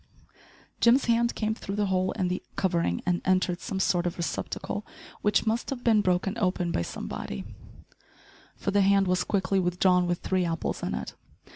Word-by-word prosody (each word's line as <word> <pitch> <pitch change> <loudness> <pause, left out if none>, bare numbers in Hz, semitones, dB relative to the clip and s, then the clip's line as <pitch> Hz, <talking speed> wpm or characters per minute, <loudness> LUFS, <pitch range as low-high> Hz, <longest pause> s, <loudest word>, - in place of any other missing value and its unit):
Jim's 240 +3 +5
hand 235 0 +2
came 220 0 0
through 200 -2 -6
the 210 0 +1
hole 185 -1 +1
in 185 - -1
the 180 +1 -2
covering 170 - 0
and 175 -1 +1
entered 185 -1 +1
some 195 -5 -3
sort 180 -2 +2
of 175 - -4
receptacle, 175 +5 -3 0.4
which 210 +1 +2
must 225 +2 0
have 255 -3 -4
been 220 -3 +4
broken 185 +1 +1
open 180 -3 0
by - - 0
somebody, 65 -5 -5 1.1
for - - -2
the 200 0 +3
hand 195 0 +4
was 180 0 +2
quickly 195 -1 +1
withdrawn 180 0 +3
with 175 0 0
three 185 +1 0
apples 165 -2 -2
in - - -2
it. 65 0 -5
185 Hz, 175 wpm, -27 LUFS, 180-205 Hz, 1.1 s, Jim's